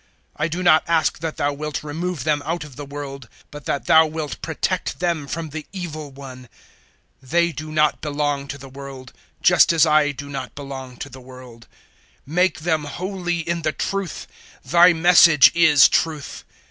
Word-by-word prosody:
017:015 - - -36 0.3
I 155 - 0
do 170 +3 -4
not 155 -3 +5
ask 165 -1 +1
that 160 0 -5
Thou 145 0 0
wilt 150 0 -5
remove 160 0 -4
them 150 -1 0
out 165 +2 -3
of 145 -4 -12
the 145 +2 -7
world, 140 -3 -8 0.2
but 145 -2 -10
that 140 - -2
Thou 160 0 +6
wilt 155 -2 -6
protect 175 +3 -3
them 170 -5 -1
from 165 +2 -5
the 150 +1 -7
Evil 155 -6 -6
one. 130 -2 -11 0.7
017:016 130 - -17
They 170 +1 +2
do 155 +1 -8
not 150 -1 +1
belong 145 -2 -2
to 140 - -6
the 135 0 -11
world, 135 -1 -10 0.3
just - - +5
as 165 -1 +4
I 155 -1 +3
do 145 +1 -9
not 135 -2 -7
belong 135 -3 -8
to 140 - -7
the 130 -1 -12
world. 125 -2 -14 0.6
017:017 150 - -10
Make 180 +2 +2
them 160 -2 0
holy 175 +3 -4
in 170 +1 -3
the 155 -1 -1
truth: 195 -3 -4 0.4
Thy 175 +6 +6
Message 170 -4 +6
is 155 -5 +6
truth. 155 -3 -2
150 Hz, 185 wpm, -21 LUFS, 140-165 Hz, 0.7 s, Thou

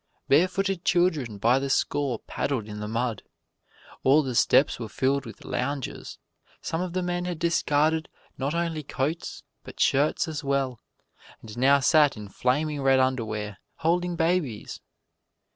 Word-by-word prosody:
Barefooted 185 +4 +2
children 160 - +1
by 120 +6 +3
the 135 0 -3
score 135 -2 0
paddled 120 -1 -3
in 105 -1 -7
the 105 - -4
mud. 115 -1 -2 0.8
All 145 +4 +5
the 130 -2 -3
steps 135 +3 +3
were 115 -2 -5
filled 135 +3 0
with 115 - -11
loungers; 140 +1 -4 0.4
some 165 - -3
of 180 -1 -4
the 185 0 -1
men 175 0 -2
had 180 -2 -3
discarded 160 -1 +1 0.3
not 140 +4 -2
only 170 -2 -1
coats 145 +3 -3 0.2
but - - -12
shirts 145 +5 +2
as 155 -2 -5
well, 135 -3 -1 0.6
and 110 -1 -9
now 135 +3 +4
sat 145 0 +4
in 105 -1 -8
flaming 145 +7 0
red 135 -1 +4
underwear, 110 -6 -1 0.2
holding 175 +2 0
babies. 165 - -1
140 Hz, 145 wpm, -26 LUFS, 125-165 Hz, 0.8 s, All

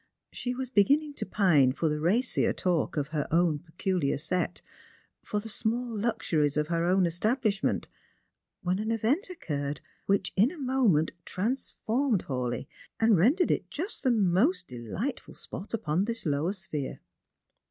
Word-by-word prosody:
She 250 0 -3
was 260 -1 -4
beginning 285 +7 +3
to - - -3
pine 150 -11 +4
for 160 - 0
the 150 0 0
racier 215 +11 +2
talk 175 -4 0
of 145 -1 -1
her 150 -2 -2
own 165 -2 +2
peculiar 170 -2 -1
set, 170 +5 -1 0.6
for 210 - -2
the 215 - -7
small 230 +2 -1
luxuries 160 -9 0
of 150 +1 0
her 170 -1 +1
own 185 +1 +3
establishment, 210 +4 0 0.8
when 185 +1 0
an 215 +1 -2
event 230 - +1
occurred 145 - -3 0.3
which, 195 -1 +1
in 210 +6 +5
a 345 - -10
moment, 250 - +2
transformed 235 +1 -1
Hawleigh, 125 -2 -2 0.3
and 225 -1 +5
rendered 265 - +4
it - - -1
just 365 +8 -4
the 260 - +2
most 215 - +3
delightful 125 - -5
spot 195 - -7
upon 185 -4 0
this 230 -1 -3
lower 150 +5 0
sphere. 165 -8 -5
195 Hz, 150 wpm, -29 LUFS, 160-235 Hz, 0.8 s, in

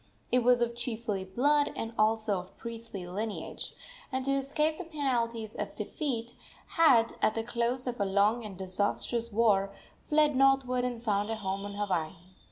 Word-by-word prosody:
It 250 - +5
was 245 0 +4
of 235 0 0
chiefly 230 -4 -3
blood, 285 +10 +2
and 225 0 -4
also 215 -2 +2
of 180 +1 -12
priestly 230 -5 -7
lineage, 205 +4 -4 0.4
and, 260 0 -2
to 275 - +1
escape 290 +3 +1
the - - -5
penalties 235 - -1
of - - -5
defeat, 245 -7 -3 0.4
had, 250 -9 +5
at 215 - +2
the 225 - -1
close 240 +2 -1
of 245 -2 -3
a - - +3
long 205 +4 +2
and 205 -4 -8
disastrous 205 +5 0
war, 200 -3 +2 0.3
fled 300 -1 +4
northward 265 -2 +3
and 240 -2 -4
found 205 -2 0
a 225 - -1
home 195 -1 -3
on 200 0 -6
Hawaii. 185 -6 -1
230 Hz, 170 wpm, -30 LUFS, 205-255 Hz, 0.4 s, It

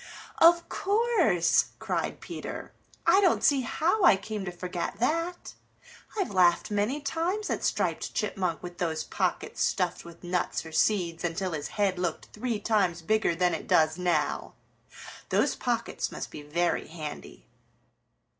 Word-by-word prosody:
"Of 340 +1 +6
course," 390 - +2
cried - - -3
Peter. - - -7 0.3
"I 390 - +6
don't 370 -3 +3
see 280 -2 +4
how 320 - 0
I 285 - +8
came 205 0 -5
to 180 - -3
forget 180 +1 -4
that. 330 +8 -1 0.6
I've 390 - -1
laughed 180 +1 +3
many 210 +8 0
times 340 +9 -1
at - - -2
Striped - - -1
Chipmunk 185 -6 -1
with 175 -1 -8
those 165 -3 -1
pockets - - -2
stuffed 180 -3 0
with 170 +1 -13
nuts 180 -1 -1
or 160 - -9
seeds 170 0 +1
until 175 +2 -1
his 150 -3 -3
head 195 -3 +1
looked 175 -3 -3
three 225 0 -2
times 190 -7 +1
bigger 215 -2 +2
than 180 +1 +2
it - - -4
does 160 +2 +3
now. 180 -1 0 0.7
Those - - +2
pockets - - -2
must - - -6
be 150 - -8
very 170 +4 -1
handy." 150 - -8
185 Hz, 145 wpm, -28 LUFS, 170-265 Hz, 0.7 s, I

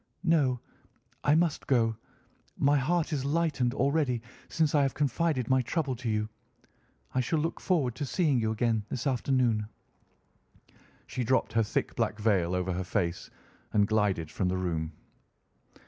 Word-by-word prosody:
"No, 145 -8 +3 0.6
I 145 - +4
must 165 -2 +1
go. 115 -4 +2 0.6
My 145 +1 +3
heart 160 +4 +1
is 140 -3 -1
lightened 140 -4 0
already 135 -3 +1 0.3
since 160 -2 +1
I 145 - +4
have 135 -2 0
confided 145 -2 0
my 130 0 +3
trouble 140 +1 -1
to 120 -1 -3
you. 105 0 0 0.9
I 130 - +1
shall 130 +6 0
look 160 +2 -1
forward 150 - +1
to 145 - -2
seeing 145 -3 +2
you 110 -1 0
again 110 0 +1
this 120 - -4
afternoon." 125 -5 +1 1.4
She 125 - -3
dropped 130 +3 +1
her 115 - +3
thick 105 - -1
black - - 0
veil 95 -5 +1
over 90 0 -1
her 90 +1 -2
face 90 -2 -2 0.4
and 105 -1 +4
glided 100 -7 +1
from 95 - -1
the 90 +1 0
room. 80 -3 -2
125 Hz, 155 wpm, -29 LUFS, 105-145 Hz, 1.4 s, I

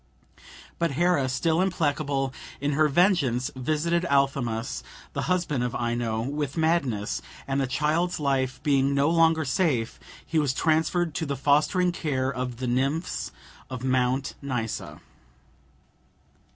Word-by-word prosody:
But 170 -4 +1
Hera, 170 -3 +2
still 160 +6 +1
implacable 145 -7 0 0.3
in 145 +1 0
her 155 +2 +3
vengeance, 145 - +2
visited 155 +6 0
Athamas, 120 - 0 0.3
the - - -2
husband 175 -8 +1
of 125 - -2
Ino, 120 -2 -1
with 145 +3 -3
madness, 150 -11 0 0.3
and 135 0 0
the 135 - 0
child's 155 +6 0
life 135 -3 0
being 140 -2 +2
no 140 +3 +3
longer 165 -2 +4
safe, 130 -6 0 0.3
he 160 - +1
was 140 -4 +1
transferred 160 +2 +1
to 160 +1 -2
the 140 -1 -2
fostering 150 +7 +3
care 135 -5 -1
of 125 -1 -4
the 130 - -4
nymphs 135 +7 -1 0.4
of 130 -1 -6
Mount 130 +1 +1
Nysa. 125 -6 -4
140 Hz, 130 wpm, -26 LUFS, 130-160 Hz, 0.4 s, longer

